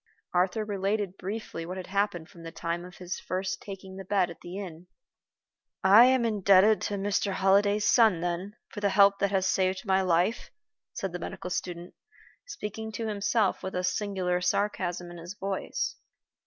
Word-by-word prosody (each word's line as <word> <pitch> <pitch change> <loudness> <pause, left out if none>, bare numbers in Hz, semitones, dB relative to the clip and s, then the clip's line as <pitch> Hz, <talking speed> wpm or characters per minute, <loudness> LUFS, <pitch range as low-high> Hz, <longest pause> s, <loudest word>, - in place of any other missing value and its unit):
Arthur 185 +4 +1
related 200 -1 -1
briefly 195 -3 -5
what 180 +3 -6
had 185 - -5
happened 190 -4 -1
from 170 - -15
the 165 0 -8
time 170 +1 -3
of 180 - -12
his 180 0 -5
first 190 +1 -3
taking 190 -1 -9
the 195 - -6
bed 190 -2 +1
at 165 - -13
the 175 +2 -7
inn. 180 -3 -8 1.0
"I 205 +5 +8
am 255 -2 +3
indebted 205 -1 +5
to 205 - -2
Mr. 200 0 0
Holliday's 200 +2 +3
son, 220 -8 +5
then, 175 +4 -3
for 210 - -7
the 205 -1 +1
help 200 0 +5
that 200 - +2
has 190 -1 +1
saved 190 +2 +1
my 190 -1 +3
life," 185 +5 +1 0.4
said 195 - -4
the 180 - -4
medical 180 +1 -6
student, 175 -1 -4 0.5
speaking 220 - -6
to 225 - -3
himself, 210 0 +1
with 190 - -5
a 180 - -1
singular 185 -2 -1
sarcasm 180 -2 -1
in 175 - -9
his 175 +4 -8
voice. 195 -1 -3
190 Hz, 175 wpm, -28 LUFS, 180-205 Hz, 1.0 s, I